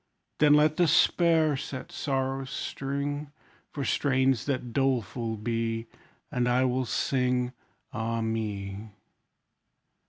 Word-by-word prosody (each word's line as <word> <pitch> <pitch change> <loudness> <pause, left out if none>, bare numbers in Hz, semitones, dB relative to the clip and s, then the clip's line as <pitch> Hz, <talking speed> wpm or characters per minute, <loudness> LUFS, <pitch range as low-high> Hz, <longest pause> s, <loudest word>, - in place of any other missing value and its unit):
Then 150 -1 +6
let 150 +1 +4
despair 165 -2 +4
set 130 -1 -6
sorrow's 135 -1 -2
string, 140 +2 -3 0.4
For 140 -2 -4
strains 130 -3 +2
that 130 -4 -2
doleful 120 -4 0
be; 115 +1 -2 0.5
And 125 -1 +1
I 125 +1 +3
will 130 0 0
sing, 125 0 0 0.4
Ah 115 0 -2
me! 105 -2 -3
130 Hz, 100 wpm, -28 LUFS, 115-140 Hz, 0.5 s, Then